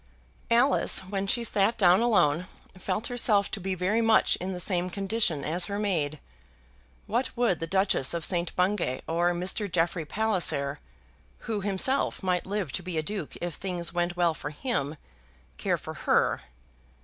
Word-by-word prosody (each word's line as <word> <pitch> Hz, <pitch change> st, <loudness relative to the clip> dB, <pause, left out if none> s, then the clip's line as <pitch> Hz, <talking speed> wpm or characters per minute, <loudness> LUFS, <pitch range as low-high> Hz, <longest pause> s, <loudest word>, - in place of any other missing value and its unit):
Alice, 240 Hz, +4 st, +4 dB
when 195 Hz, +1 st, -3 dB
she 235 Hz, +4 st, +1 dB
sat 215 Hz, 0 st, +2 dB
down 185 Hz, -1 st, +5 dB
alone, 180 Hz, -8 st, +2 dB, 0.3 s
felt 210 Hz, +4 st, -3 dB
herself 215 Hz, -5 st, +1 dB
to 215 Hz, -, -3 dB
be 190 Hz, 0 st, -2 dB
very 190 Hz, +6 st, +1 dB
much 225 Hz, -1 st, +4 dB
in 185 Hz, +2 st, -4 dB
the 180 Hz, -, -5 dB
same 180 Hz, 0 st, 0 dB
condition 195 Hz, -4 st, 0 dB
as 175 Hz, +3 st, 0 dB
her 200 Hz, +2 st, -4 dB
maid. 160 Hz, -8 st, -1 dB, 0.9 s
What 240 Hz, +4 st, -1 dB
would 235 Hz, -8 st, +2 dB
the 165 Hz, -, -4 dB
Duchess 190 Hz, -6 st, +2 dB
of 170 Hz, -, -2 dB
St. 175 Hz, -2 st, -1 dB
Bungay 180 Hz, -8 st, 0 dB
or 170 Hz, +2 st, +1 dB
Mr. 185 Hz, +3 st, -1 dB
Jeffrey 165 Hz, -1 st, 0 dB
Palliser, 150 Hz, -8 st, 0 dB, 0.6 s
who 220 Hz, -3 st, -3 dB
himself 205 Hz, +6 st, 0 dB
might 180 Hz, -1 st, 0 dB
live 195 Hz, -7 st, -2 dB
to 185 Hz, -, -3 dB
be 180 Hz, -2 st, -5 dB
a 155 Hz, -, 0 dB
duke 195 Hz, -3 st, -5 dB
if 175 Hz, -1 st, -3 dB
things 175 Hz, 0 st, -3 dB
went 175 Hz, 0 st, -1 dB
well 170 Hz, -2 st, +3 dB
for 145 Hz, -, -6 dB
him, 150 Hz, -, -2 dB, 0.6 s
care -, -, 0 dB
for -, -, -8 dB
her? -, -, +1 dB
185 Hz, 165 wpm, -27 LUFS, 170-210 Hz, 0.9 s, down